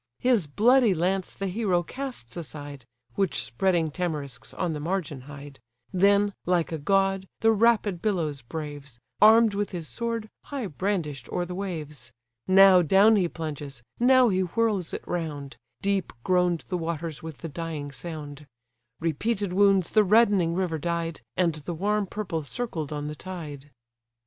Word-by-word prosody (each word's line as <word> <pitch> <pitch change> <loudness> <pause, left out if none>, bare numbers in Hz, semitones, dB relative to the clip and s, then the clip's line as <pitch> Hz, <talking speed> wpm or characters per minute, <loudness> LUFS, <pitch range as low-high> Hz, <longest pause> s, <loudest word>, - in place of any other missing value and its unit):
His 240 -10 +2
bloody 230 - +4
lance 185 +3 -1
the 195 - -4
hero 185 -2 0
casts 250 - -6
aside, 145 -4 -7 0.3
(Which 195 -3 0
spreading 160 - +1
tamarisks 145 -7 -4
on 175 -3 -2
the 150 - -4
margin 155 -4 -3
hide,) 145 -1 -10 0.3
Then, 200 +2 +4
like 175 -2 +1
a 160 - -3
god, 195 +3 +1
the 225 0 +5
rapid 215 -4 +2
billows 165 -10 -1
braves, 145 -1 -7 0.2
Arm'd 220 0 +7
with 205 0 -1
his 170 -3 -5
sword, 230 +2 -3 0.2
high 275 -5 -4
brandish'd 160 - -3
o'er 175 - -1
the 180 - -6
waves: 155 -9 -6 0.4
Now 190 -1 +7
down 195 +7 +5
he 190 -4 +2
plunges, 145 -6 -6 0.2
now 255 0 +5
he 185 -2 +1
whirls 195 0 0
it - - -6
round, 150 -5 -4 0.3
Deep 200 -1 0
groan'd 180 -2 +1
the 180 -2 -1
waters 165 -2 -4
with 160 -2 -8
the - - -2
dying 155 -2 -5
sound; 150 -1 -8 0.5
Repeated 190 +5 -1
wounds 195 -2 +4
the 215 - +5
reddening 200 -5 +4
river 175 -4 -1
dyed, 170 0 -3 0.2
And 175 -3 +2
the 155 +3 -6
warm 205 +3 0
purple 180 -5 -3
circled 160 - -4
on 145 -1 -3
the 150 - -4
tide. 150 -4 -8
175 Hz, 155 wpm, -26 LUFS, 150-200 Hz, 0.5 s, Arm'd